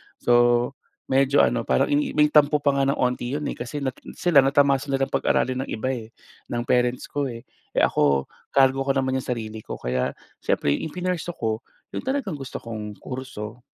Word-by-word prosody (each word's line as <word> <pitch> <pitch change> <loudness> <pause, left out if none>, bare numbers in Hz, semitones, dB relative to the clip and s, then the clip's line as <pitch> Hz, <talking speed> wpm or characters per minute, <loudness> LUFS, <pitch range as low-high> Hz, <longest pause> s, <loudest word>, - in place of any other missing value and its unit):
So, 120 +1 +3 0.4
medyo 135 +1 +4
ano, - - +1
parang 65 - +2
i 145 +1 +1
may 150 0 +4
tampo 150 0 +4
pa 140 - +4
nga 135 0 +1
ng 140 - +2
'onti 125 +1 -1
'yon, 150 - -3
eh, - - -6
kasi 140 +4 -5
na 130 - 0 0.2
sila 170 -6 +4
natamasa 140 +1 +3
nila 135 -1 0
pag-aralin 130 +1 +1
ng - - -10
iba 120 +4 -1
eh, 115 -4 -5 0.4
ng 120 0 -2
parents 125 +1 +1
ko, 145 -1 -1
eh. 115 -2 -7 0.3
Eh, - - +3
ako, 70 -2 +2 0.2
kargo 135 0 +4
ko 135 - +2
naman 130 0 +1
'yong - - -9
sarili 110 -3 -4
ko - - -7
kaya 65 +1 -2 0.2
siyempre 70 - +1
'yong 75 - -1
ipinursue 180 -1 -3
ko, 110 -1 -1 0.3
'yon - - -3
talagang 255 - -2
gusto 135 - -7
kong 105 -2 -6
kurso. 125 -3 -7
130 Hz, 190 wpm, -24 LUFS, 120-140 Hz, 0.4 s, medyo